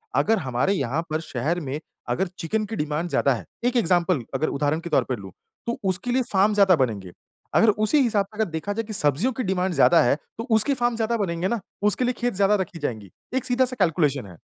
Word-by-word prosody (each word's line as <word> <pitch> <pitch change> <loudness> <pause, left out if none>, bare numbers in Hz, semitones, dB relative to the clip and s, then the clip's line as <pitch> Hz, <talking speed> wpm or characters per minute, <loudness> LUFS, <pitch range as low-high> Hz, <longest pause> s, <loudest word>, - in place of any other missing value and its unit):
अगर 225 - +3
हमारे 130 +6 0
यहाँ 140 -3 -1
पर 155 0 -1
शहर 155 +4 -2
में 145 -2 -4 0.3
अगर 190 +2 0
चिकन 215 +6 -1
की 220 +2 -5
डिमांड 150 +1 -2
ज़्यादा 140 -4 +2
है, 110 -8 -6 0.2
1 250 +1 +1
एग्ज़ाम्पल 175 - +2
अगर 135 +4 0
उदाहरण 145 +2 0
के 170 +1 -7
तौर - - +3
पर 130 -3 -3
लूँ 95 -2 -10 0.3
तो 235 - -2
उसके 200 +7 -1
लिए 255 +1 +2
फ़ार्म 200 +2 +3
ज़्यादा 195 -3 +5
बनेंगे। 110 - -2 0.4
अगर 225 - +5
उसी 215 +8 +3
हिसाब 215 -6 +2
से 210 +2 -19
अगर 220 -5 0
देखा 160 +6 -3
जाए 225 +2 -2
कि 220 0 -7
सब्ज़ियों 160 - +2
की 255 - -3
डिमांड 185 -2 0
ज़्यादा 170 +1 +5
है 120 - +3 0.2
तो 225 - -4
उसके 220 +5 +4
फ़ार्म 240 -2 0
ज़्यादा 230 +1 0
बनेंगे 175 -3 -1
ना, 235 +3 -1 0.2
उसके 210 +5 +2
लिए 250 - +1
खेत 245 0 -1
ज़्यादा 200 +2 +3
रखी 180 -2 -6
जाएँगी, 110 - -4 0.2
एक 260 -1 -1
सीधा-सा 255 0 +1
कैलकुलेशन 150 - +1
है। 90 -3 -13
185 Hz, 225 wpm, -24 LUFS, 150-220 Hz, 0.4 s, ज़्यादा